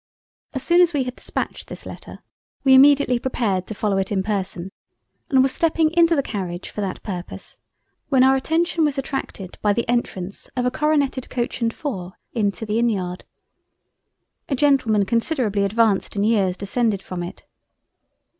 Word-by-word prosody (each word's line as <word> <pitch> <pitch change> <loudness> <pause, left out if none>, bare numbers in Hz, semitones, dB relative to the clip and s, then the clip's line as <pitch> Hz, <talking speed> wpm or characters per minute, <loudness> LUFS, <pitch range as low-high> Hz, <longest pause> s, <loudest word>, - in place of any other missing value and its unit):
As 265 - -1
soon 345 +1 +5
as 345 -1 +4
we 280 -3 +1
had 250 0 -5
dispatched - - -4
this - - -9
Letter, - - -10 0.4
we 265 -1 +6
immediately 275 -2 +6
prepared 210 -8 -1
to 215 - -5
follow 200 -1 0
it 195 +1 -2
in 190 -2 +1
person 190 -3 -3 0.6
and 265 -2 +5
were - - +4
stepping 320 +2 +1
into 335 0 +4
the 280 - +1
Carriage 185 -6 -5
for 210 - -4
that 195 -2 -4
Purpose 180 -4 -7 0.5
when 265 -3 +5
our 265 0 +5
attention 325 +4 +1
was 295 -2 +1
attracted 265 -8 -5
by 205 -1 +3
the 235 +3 -1
Entrance 200 -6 -2
of 250 - +1
a 250 - +2
coroneted 285 -3 0
Coach 245 0 -3
and 230 -1 +2
4 190 - -5 0.2
into 215 -1 -1
the 215 +1 0
Inn 235 0 +3
yard. 185 -4 -3 1.2
A 275 - +1
Gentleman 250 -7 +3
considerably 230 -2 +1
advanced 215 0 +1
in 200 - +1
years 200 -4 +2
descended 205 0 0
from 180 -1 -5
it. 175 - -8
230 Hz, 170 wpm, -22 LUFS, 200-270 Hz, 1.2 s, we